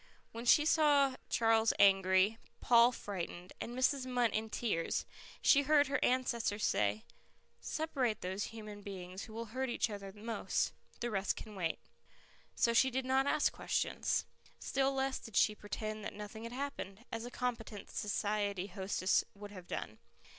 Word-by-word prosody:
When 230 +1 -7
she 295 +5 +6
saw 290 -4 +4
Charles 225 -1 +3
angry, 195 +2 +4 0.2
Paul 235 0 +6
frightened, 185 -5 -6
and 240 +2 -5
Mrs. 260 0 +2
Munt 245 -3 +2
in 220 +1 -2
tears, 210 -7 -1 0.4
she 280 - +6
heard 290 0 +4
her 285 - 0
ancestors 235 -4 +1
say, 105 +1 +1 0.6
"Separate 265 -8 -1
those 190 +3 -2
human 210 -2 -8
beings 190 -2 -7
who 220 - -12
will 230 +1 -4
hurt 260 0 -1
each 235 - 0
other 200 -1 -6
most. 220 +3 -2 0.3
The 240 0 -1
rest 195 -1 0
can 215 - -9
wait." 175 -5 -1 0.8
So 235 - +3
she 245 +3 +5
did 260 0 -2
not 265 +1 +2
ask 295 - +2
questions. - - 0 0.3
Still 270 0 0
less 270 0 -1
did 225 - -11
she 215 - +5
pretend 215 +1 -5
that - - -5
nothing 210 +2 -8
had 230 - -6
happened, 245 -6 -5
as 230 0 -3
a 245 - -5
competent 230 -5 -4
society 205 -2 -1
hostess 190 -1 0
would 205 0 -9
have 185 -3 -10
done. 110 - -5
225 Hz, 160 wpm, -34 LUFS, 200-255 Hz, 0.8 s, she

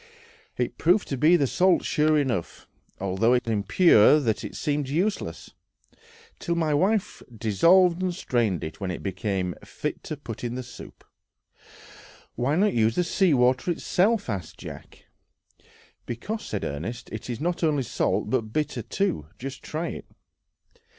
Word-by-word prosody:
It - - -2
proved 180 +5 +3
to 135 - -1
be 155 +7 +5
salt 180 +7 +2
sure 155 0 +2
enough, 125 - -2 0.3
although 100 +6 +2
so 115 -2 -3
impure 110 - +5
that 115 -7 -1
it - - -7
seemed 145 -2 -1
useless, 185 +9 -2 0.9
till 170 - -1
my 160 -3 +1
wife 190 +7 +1
dissolved 170 - +4
and 185 -1 0
strained 120 - -1
it, 80 - -6
when 95 - -2
it 90 - -5
became 95 -1 -2
fit - - -5
to 155 - -5
put 120 -6 -8
in 120 0 -3
the 130 - -4
soup. 120 - -12 1.3
"Why 135 +5 0
not 205 +4 +3
use 110 -1 +2
the 180 - +2
sea 175 -2 +2
water 125 +5 +2
itself?" 195 +5 +1
asked 95 -8 -5
Jack. - - -11 1.0
"Because," 205 - -4
said 105 - -3
Ernest, 90 - -5
"it 110 +2 -7
is 120 -2 -3
not 175 +2 -2
only 150 -4 +2
salt, 105 -3 -1
but 115 -5 0
bitter 145 -2 -1
too. 110 - -2
Just 135 +1 -7
try 160 +2 -4
it." - - -7
130 Hz, 150 wpm, -25 LUFS, 110-170 Hz, 1.3 s, be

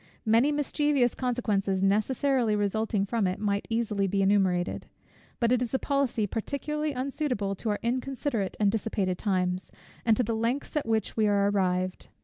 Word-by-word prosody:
Many 230 +6 +4
mischievous 290 -3 +1
consequences 205 -7 0
necessarily 225 +3 +2
resulting 205 0 0
from 215 -1 0
it 185 - -2
might 200 -1 -1
easily 215 -4 0
be 195 +1 +1
enumerated. 190 -3 +1 0.5
But 235 -1 +2
it 250 -1 +3
is 250 +1 -1
a - - +4
policy 275 -6 0
particularly 295 +8 -2
unsuitable 255 -6 -2
to 225 - -3
our 205 - 0
inconsiderate 250 -3 -2
and 205 -2 +3
dissipated 200 -4 -1
times, 185 -2 -1 0.3
and 225 -2 +3
to 250 - +2
the 230 0 -1
lengths 235 +8 -2
at 295 -6 -1
which 220 -3 0
we 215 -1 +2
are 200 0 +3
arrived. 185 -2 -1
220 Hz, 160 wpm, -28 LUFS, 200-250 Hz, 0.5 s, Many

